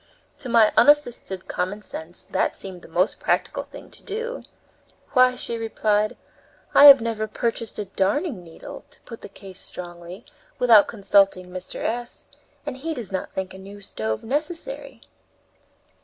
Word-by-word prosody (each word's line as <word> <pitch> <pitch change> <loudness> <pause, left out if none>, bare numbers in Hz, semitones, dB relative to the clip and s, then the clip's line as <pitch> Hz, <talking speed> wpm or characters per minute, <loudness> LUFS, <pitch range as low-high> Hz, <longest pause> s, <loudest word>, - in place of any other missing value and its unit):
To 255 - -7
my 230 -2 +5
unassisted 245 -10 +3
common 195 +4 -3
sense 165 -2 -4
that - - +1
seemed 185 -2 -8
the - - -13
most 180 +4 0
practical - - 0
thing - - -12
to - - -15
do. 465 +4 -5 0.7
"Why," 255 -1 +5
she 235 -2 -4
replied, 215 -1 0 0.6
"I 285 - +8
have 280 -3 +11
never 225 -1 -2
purchased 230 +1 -3
a 210 - -3
darning 200 - -1
needle, 165 -1 -11
to - - -16
put 230 - -11
the - - -9
case 190 -2 -11
strongly, 175 +3 -9 0.3
without 230 -4 +6
consulting 195 -3 +2
Mr. 185 0 -6
S., 240 +1 -3 0.4
and 255 - -5
he 320 +4 -4
does 225 -7 -6
not 190 - -3
think 190 -1 -4
a 190 - -10
new 200 +2 -11
stove 110 - -4
necessary." 315 - -4
215 Hz, 155 wpm, -24 LUFS, 190-250 Hz, 0.7 s, have